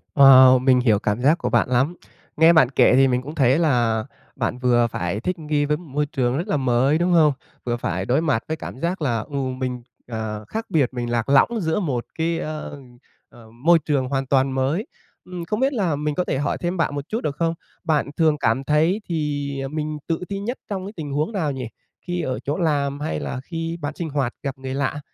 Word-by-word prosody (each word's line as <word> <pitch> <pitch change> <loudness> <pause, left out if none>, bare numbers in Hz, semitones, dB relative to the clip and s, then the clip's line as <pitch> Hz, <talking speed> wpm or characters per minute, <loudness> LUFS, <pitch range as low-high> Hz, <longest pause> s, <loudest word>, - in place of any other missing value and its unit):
Wow, 130 -2 +8
mình 130 0 +4
hiểu 110 -5 +3
cảm 105 +3 -1
giác 150 +6 +4
của - - -2
bạn - - +2
lắm. 130 +7 +1 0.4
Nghe 160 +2 +7
bạn 155 -7 +5
kể 135 - +4
thì 135 +1 +5
mình 125 -1 +1
cũng 145 +5 -8
thấy 135 0 +3
là 120 -8 +2 0.3
bạn 120 -1 -2
vừa 120 -2 +3
phải 90 -2 -3
thích 180 +8 -3
nghi 150 -2 0
với 150 +1 0
một 175 - -13
môi 145 +2 -1
trường 130 -3 -1
rất 170 +6 -3
là 175 - +1
mới, 130 +2 +2
đúng 175 +2 +1
hông? 155 -4 +5 0.3
Vừa 120 -1 -1
phải 95 -4 -3
đối 130 +7 +2
mặt 145 -9 0
với 160 - -3
cảm 130 - -8
giác 170 +3 -2
là, 120 -6 0
ừ, 125 +7 -9
mình, 130 -2 -3 0.3
à, 110 -2 -4
khác 225 +1 -4
biệt, 150 -9 +2
mình 120 -1 -3
lạc 120 +1 -1
lõng 140 +7 +5
giữa 160 0 0
một 135 - -2
cái, 165 +1 0
a, 155 -2 -4 0.7
à, - - -17 0.2
môi 170 +1 +6
trường 140 -5 -1
hoàn 135 0 -1
toàn 135 0 +2
mới. 140 - 0 0.4
Ừm, 180 -2 -7
không 210 +3 -2
biết 270 +2 +2
là 185 - 0
mình 150 0 -2
có 180 - +1
thể - - -2
hỏi 145 +1 -1
thêm 175 +1 -3
bạn 165 -3 0
một 140 - -4
chút 225 +2 -2
được 145 - -2
không? 165 +1 0 0.3
Bạn 155 -4 +1
thường 155 -2 +3
cảm 120 0 +1
thấy 160 +8 +2
thì, 150 -3 -2
à, - - -3
mình 155 +1 -4
tự 165 -1 -1
ti 200 -1 -3
nhất 235 +6 -4
trong 190 -2 -3
cái 200 - -8
tình 150 -4 -6
huống 150 +9 -1
nào 165 -8 -1
nhỉ? 130 -3 -5 0.4
Khi 175 0 -2
ở 130 -5 -2
chỗ 145 - -3
làm, 145 -5 0
hay 150 +2 -3
là 130 - -4
khi 165 +1 -4
bạn 145 +1 -3
sinh 170 -2 -4
hoạt 135 -4 -1
gặp 135 -1 -4
người 130 0 -6
lạ, 140 +1 -1
145 Hz, 235 wpm, -22 LUFS, 130-165 Hz, 0.7 s, Wow